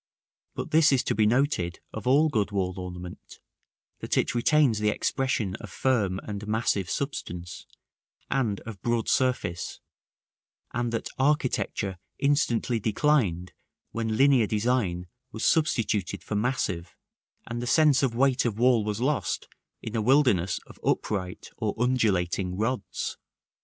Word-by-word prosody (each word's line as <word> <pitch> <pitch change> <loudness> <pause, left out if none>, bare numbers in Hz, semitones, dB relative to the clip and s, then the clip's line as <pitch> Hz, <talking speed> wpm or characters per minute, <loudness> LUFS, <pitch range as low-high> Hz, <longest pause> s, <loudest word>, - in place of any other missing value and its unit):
But - - -5
this 160 0 +5
is 135 -2 +3
to - - 0
be 105 0 +3
noted 115 - +1
of 110 +2 -6
all 145 +5 +5
good 110 -9 0
wall 95 -3 -1
ornament, 90 -1 -8 0.6
that - - -2
it - - +1
retains 125 -2 +3
the 105 0 +2
expression 115 -5 -1
of - - -10
firm 105 -8 0
and 105 0 -6
massive 105 -4 0
substance, 90 -11 -5 0.6
and 115 -7 0
of 110 -5 -9
broad 120 -1 0
surface, 125 -10 0 0.9
and 120 -1 -1
that 115 - -3
architecture 130 - 0 0.2
instantly 125 -4 +1
declined 105 - +1 0.4
when 110 -1 -2
linear 135 -5 +5
design 105 -5 0 0.3
was 110 - -3
substituted 115 - +1
for - - -6
massive, 105 -6 -1 0.5
and 120 0 -4
the 120 - -4
sense 150 -1 +4
of 130 -4 0
weight 135 +1 +3
of 115 -4 -1
wall 120 -2 +4
was 105 0 -2
lost 145 +3 -1 0.4
in 110 - -5
a 110 - +1
wilderness 110 - +3
of - - -15
upright 90 -3 -2
or - - -2
undulating 95 -7 +1
rods. 110 -4 -2
115 Hz, 135 wpm, -27 LUFS, 100-130 Hz, 0.9 s, this